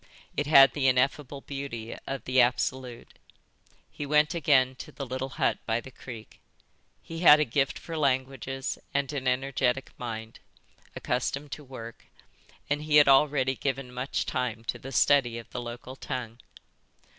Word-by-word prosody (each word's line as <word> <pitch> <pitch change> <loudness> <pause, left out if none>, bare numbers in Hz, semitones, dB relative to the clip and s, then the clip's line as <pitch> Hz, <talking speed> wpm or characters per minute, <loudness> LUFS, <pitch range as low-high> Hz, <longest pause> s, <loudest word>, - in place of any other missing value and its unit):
It 145 - -1
had 135 -4 +8
the 135 -2 +1
ineffable 135 +2 +1
beauty 135 -6 -6
of 135 -1 -4
the 130 0 +4
Absolute. 125 0 -1 0.8
He - - -6
went 150 +2 +3
again 140 -6 +3
to - - -9
the 140 - -6
little 130 +1 -4
hut - - +1
by 115 0 +1
the 130 +3 -11
creek. 115 -4 -11 0.6
He 165 0 -7
had 155 -3 +8
a 150 - +3
gift 135 +2 0
for 165 - -7
languages 135 -2 -1 0.2
and 140 +1 0
an 135 -2 -3
energetic 130 0 0
mind, 110 -2 -6 0.6
accustomed 140 +1 -2
to 150 - -6
work, 115 -4 -10 0.6
and 145 +1 -1
he 150 0 0
had 150 -1 +8
already 135 -1 +4
given 135 -1 -3
much 125 +2 -2
time 120 -3 -2
to - - -4
the 135 - -8
study 120 0 +3
of 115 - -10
the 125 - -4
local 120 +2 -8
tongue. 125 -4 -6
135 Hz, 155 wpm, -28 LUFS, 125-140 Hz, 0.8 s, had